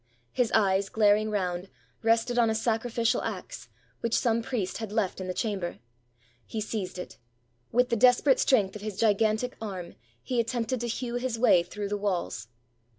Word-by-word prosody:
His 245 -3 +1
eyes, 195 -2 +3
glaring 215 0 +3
round, 185 -3 -2 0.3
rested 230 +2 +2
on 230 -1 +4
a 220 - 0
sacrificial 230 +1 0
axe, - - -6 0.3
which 230 -1 0
some 230 -2 +1
priest 225 -5 -3
had 220 -3 -5
left 205 -3 -1
in 185 - -5
the - - -1
chamber: 200 -6 -2 0.7
he 220 - -5
seized 205 -4 -4
it. 180 - -8 0.5
With 250 +1 +3
the 235 - +2
desperate 250 +3 +5
strength 210 -8 +3
of 210 - -7
his 210 -2 -5
gigantic 220 +3 +2
arm, 185 -5 -6 0.3
he 250 -2 -1
attempted 235 +1 -1
to 240 - -2
hew 240 +1 -3
his 245 -2 -2
way 225 -7 +5
through 200 +4 -5
the 205 - -1
walls. 180 - -2
220 Hz, 170 wpm, -28 LUFS, 200-235 Hz, 0.7 s, desperate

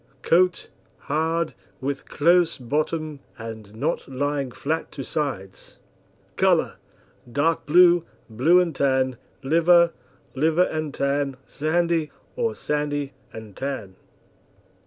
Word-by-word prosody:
COAT 180 +1 +3 0.3
Hard, 160 +2 -1 0.3
with 140 +1 -4
close 170 +2 +3
bottom, 150 +3 -2 0.2
and 110 -2 -9
not 150 +9 -2
lying 140 0 -2
flat 160 +6 -3
to 135 - -5
sides. 130 -12 -5 0.6
COLOUR - - +2 0.5
Dark 155 +5 0
blue, 175 +1 +6 0.2
blue 135 +11 +4
and 170 -4 0
tan, 130 -2 +1 0.3
liver, 170 +4 +4 0.4
liver 160 +5 +3
and 155 -4 -2
tan, 140 -1 -1
sandy, 165 0 0 0.3
or 470 -2 -1
sandy 145 -1 -2 0.2
and 110 -3 -10
tan. 130 -9 -5
150 Hz, 105 wpm, -24 LUFS, 135-165 Hz, 0.6 s, blue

